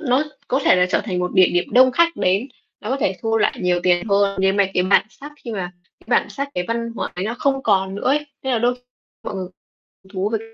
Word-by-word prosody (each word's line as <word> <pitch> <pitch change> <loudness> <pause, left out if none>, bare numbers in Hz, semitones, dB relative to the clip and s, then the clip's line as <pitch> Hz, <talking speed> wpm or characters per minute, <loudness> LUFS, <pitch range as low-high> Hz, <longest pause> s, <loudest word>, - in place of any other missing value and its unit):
nó 270 -1 +1 0.2
có 265 - +1
thể - - +5
là 180 - +3
trở - - +2
thành 185 -5 -3
một 180 0 -2
địa 185 -1 +6
điểm 175 0 +1
đông 255 +1 +6
khách 335 +3 +2
đến, 195 +9 +1 0.3
nó - - -5
có 265 - +1
thể 195 -8 -1
thu 225 0 +1
lại 210 - +1
nhiều 180 -1 +1
tiền 175 +1 +2
hơn, 200 0 +2
nhưng 195 +1 +2
mà 200 - +4
cái 180 - +2
bản 195 +3 +3
sắc 290 +4 -12
khi 235 - -5
mà 180 -3 -4 0.3
cái - - -24
bản - - -12
sắc, 280 0 -4
cái 180 - -1
văn 230 0 -2
hóa - - -2
ấy 180 +2 -3
nó 230 +3 -2
không 270 0 0
còn 190 0 +1
nữa 200 - -6
ấy, 295 +3 +1 0.2
nên 265 -1 -1
là 235 - +2
đôi 245 +2 +1 0.5
mọi - - -5
người 190 - -4 0.6
hứng 190 - -21
thú 195 +2 -1
về 220 0 -1
205 Hz, 270 wpm, -20 LUFS, 185-255 Hz, 0.6 s, địa